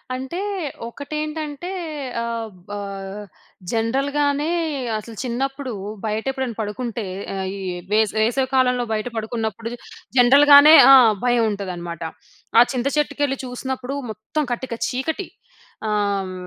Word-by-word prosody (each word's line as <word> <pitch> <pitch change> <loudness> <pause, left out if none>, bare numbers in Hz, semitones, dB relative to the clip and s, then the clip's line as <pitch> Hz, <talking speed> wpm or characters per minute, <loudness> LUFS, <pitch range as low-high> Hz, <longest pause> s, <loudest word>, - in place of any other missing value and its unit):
అంటే 265 +7 -5 0.5
ఒకటేంటంటే, 305 +4 -5 0.5
ఆహ్, 230 -3 -4 0.2
ఆహ్, 200 0 -6 0.5
జనరల్‍గానే 280 +6 0 0.5
అసలు 225 +1 -9
చిన్నప్పుడు 265 +1 -3 0.3
బయట 215 +1 -1
ఎప్పుడైనా 260 -4 -3
పడుకుంటే, 225 +1 -4 0.5
ఈ - - -7 0.3
వేస 215 -1 +3
వేసవికాలంలో 250 +1 +2
బయట 215 +2 -2
పడుకున్నప్పుడు 225 0 -3 0.5
జనరల్‌గానే 285 +4 +8 0.2
ఆ! - - +11 0.3
భయం 240 -2 +3
ఉంటదనమాట. 175 -4 -5 0.6
ఆ - - +10
చింత 255 +1 -1
చెట్టుకెళ్ళి 285 -2 0
చూసినప్పుడు 260 +1 -4
మొత్తం 220 +8 -3
కటిక 250 0 -5
చీకటి. 315 +9 -3 0.6
ఆహ్, 200 -3 0
245 Hz, 100 wpm, -22 LUFS, 215-275 Hz, 0.6 s, ఆ